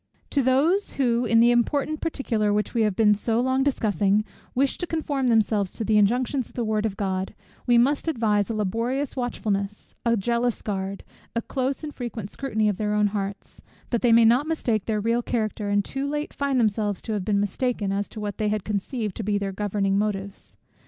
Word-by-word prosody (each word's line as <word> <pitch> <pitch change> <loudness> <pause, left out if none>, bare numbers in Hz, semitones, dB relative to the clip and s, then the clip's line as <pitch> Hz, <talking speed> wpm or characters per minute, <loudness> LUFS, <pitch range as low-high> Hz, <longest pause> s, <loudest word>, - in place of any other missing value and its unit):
To 280 - +2
those 290 +10 +2
who, 245 -3 +1
in 230 0 +4
the 240 +1 +6
important 285 +5 +1
particular 230 -10 0
which 210 +1 0
we 235 - +1
have 210 -3 +2
been 210 0 +5
so 225 +2 0
long 260 +2 +1
discussing, 210 - +2 0.3
wish 270 +2 +1
to 355 - -2
conform 290 -5 -1
themselves 215 -4 +2
to 225 - -4
the 215 0 +4
injunctions 245 +4 +1
of - - -22
the 240 - -1
word 215 0 0
of 200 -2 -7
God, 190 -1 -2 0.3
we 240 -1 +5
must 275 +6 +2
advise 220 -8 +1
a 225 - -2
laborious 230 +7 -1
watchfulness, 210 -5 -3
a 235 -1 +2
jealous 235 +3 0
guard, 195 -1 -3 0.3
a 230 - +1
close 265 +2 -2
and 300 -1 -5
frequent 230 -5 -6
scrutiny 220 -6 -1
of 205 -3 0
their 210 -1 -1
own 210 0 +3
hearts, 200 -1 -5 0.3
that 235 - +1
they 240 - +4
may 230 0 +7
not 245 +6 +4
mistake 235 -10 0
their 215 -2 0
real 230 +3 +1
character, 215 -3 -2
and 205 -1 +2
too 275 +1 -3
late 295 +1 -3
find 280 -2 0
themselves 210 -3 +1
to 220 - -3
have 205 -3 -2
been 205 0 +1
mistaken, 205 0 -1
as 200 +1 -2
to 220 - -8
what 205 0 -4
they 215 -1 +1
had 210 -2 -1
conceived 210 0 -3
to 225 - -3
be 205 0 +1
their 200 -1 -2
governing 200 0 0
motives. 200 -2 -4
225 Hz, 205 wpm, -25 LUFS, 205-250 Hz, 0.3 s, may